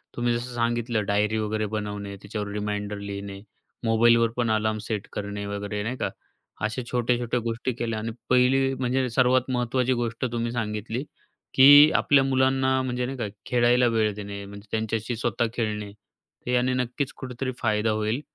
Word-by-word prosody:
तुम्ही 120 Hz, 0 st, +1 dB
जसं 120 Hz, +1 st, -4 dB
सांगितलं 120 Hz, -2 st, 0 dB
डायरी 105 Hz, +2 st, +1 dB
वगैरे 110 Hz, 0 st, -1 dB
बनवणे, 105 Hz, -1 st, -4 dB
त्याच्यावर 105 Hz, +1 st, -5 dB
रिमाइंडर 105 Hz, 0 st, -3 dB
लिहिणे, 100 Hz, -1 st, -6 dB, 0.5 s
मोबाईलवर 115 Hz, +1 st, +4 dB
पण 120 Hz, -2 st, +1 dB
अलार्म 110 Hz, 0 st, +1 dB
सेट 105 Hz, -3 st, -3 dB
करणे 100 Hz, 0 st, -4 dB
वगैरे. 100 Hz, 0 st, -4 dB
नाही 120 Hz, +4 st, -3 dB
का? -, -, -1 dB, 0.6 s
अशा 110 Hz, +4 st, -2 dB
छोट्या-छोट्या 120 Hz, 0 st, 0 dB
गोष्टी 115 Hz, +2 st, -2 dB
केल्या. 115 Hz, -2 st, -3 dB
आणि 115 Hz, +1 st, -3 dB, 0.2 s
पहिली 135 Hz, +1 st, +4 dB
म्हणजे 130 Hz, +1 st, +1 dB
सर्वात 130 Hz, +1 st, +2 dB
महत्त्वाची 125 Hz, +1 st, +1 dB
गोष्ट 120 Hz, 0 st, -2 dB
तुम्ही 120 Hz, 0 st, -2 dB
सांगितली, 110 Hz, +1 st, -3 dB, 0.5 s
की 145 Hz, +3 st, +9 dB
आपल्या 140 Hz, -2 st, +4 dB
मुलांना 130 Hz, 0 st, +2 dB
म्हणजे 125 Hz, -1 st, -2 dB
नाही 135 Hz, +2 st, -5 dB
का, 115 Hz, -, -2 dB, 0.2 s
खेळायला 120 Hz, 0 st, +3 dB
वेळ 110 Hz, -1 st, +2 dB
देणे 100 Hz, -1 st, -7 dB
म्हणजे 100 Hz, +1 st, -11 dB
त्यांच्याशी 110 Hz, +1 st, -2 dB
स्वतः 115 Hz, 0 st, 0 dB
खेळणे. 105 Hz, -3 st, -3 dB
तर 105 Hz, +4 st, -12 dB
याने 125 Hz, +1 st, +2 dB
नक्कीच 125 Hz, +2 st, -2 dB
कुठेतरी 130 Hz, 0 st, -4 dB
फायदा 110 Hz, -1 st, +1 dB
होईल 110 Hz, +4 st, -1 dB
115 Hz, 155 wpm, -25 LUFS, 105-125 Hz, 0.6 s, की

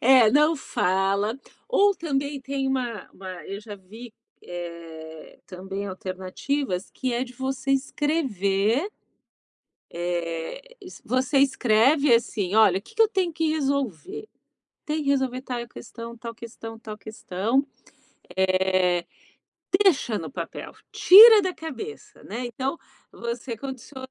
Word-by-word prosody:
É, 250 Hz, -3 st, +6 dB
não 300 Hz, +5 st, +4 dB
fala. 195 Hz, 0 st, 0 dB, 0.3 s
Ou 410 Hz, -5 st, +4 dB
também 285 Hz, -4 st, -2 dB
tem 270 Hz, +1 st, -3 dB
uma 245 Hz, -6 st, -2 dB
uma 190 Hz, 0 st, -10 dB, 0.2 s
eu 195 Hz, +1 st, -6 dB
já 210 Hz, -1 st, -9 dB
vi, 215 Hz, +5 st, -12 dB, 0.3 s
eh, 165 Hz, -2 st, -9 dB
também 195 Hz, +2 st, -6 dB
alternativas 185 Hz, +4 st, -3 dB
que 255 Hz, -2 st, -3 dB
é 240 Hz, +2 st, 0 dB
de 250 Hz, -, -12 dB
você 265 Hz, +1 st, -3 dB
escrever 265 Hz, -, 0 dB, 1.0 s
eh, 170 Hz, -, -3 dB, 0.2 s
es 370 Hz, -1 st, -12 dB
você 255 Hz, +4 st, +1 dB
escreve 270 Hz, +1 st, +4 dB
assim: 210 Hz, -4 st, 0 dB
“Olha, 200 Hz, -4 st, +5 dB
que 410 Hz, -, -18 dB
que 450 Hz, -, +4 dB
eu 445 Hz, -, +7 dB
tenho 375 Hz, -5 st, 0 dB
que 325 Hz, 0 st, 0 dB
resolver? 280 Hz, -, -2 dB, 0.6 s
Tem 310 Hz, 0 st, -1 dB
que 275 Hz, -, +1 dB
resolver 260 Hz, -2 st, 0 dB
tal 240 Hz, -2 st, -5 dB
questão, 235 Hz, 0 st, -9 dB
tal 230 Hz, 0 st, -7 dB
questão, 225 Hz, -1 st, -9 dB
tal 215 Hz, -1 st, -8 dB
questão”, 215 Hz, +5 st, -1 dB, 0.7 s
eh, 185 Hz, -2 st, +2 dB, 0.8 s
deixa 270 Hz, -, +3 dB
no 165 Hz, -, -6 dB
papel. -, -, -6 dB, 0.2 s
Tira 435 Hz, +3 st, +10 dB
da 370 Hz, -1 st, -2 dB
cabeça, 325 Hz, -, -8 dB
né? 240 Hz, +4 st, -4 dB
Então 265 Hz, +6 st, -3 dB, 0.3 s
você 235 Hz, 0 st, -5 dB
condiciona 260 Hz, +1 st, -8 dB
240 Hz, 125 wpm, -25 LUFS, 195-280 Hz, 1.0 s, Tira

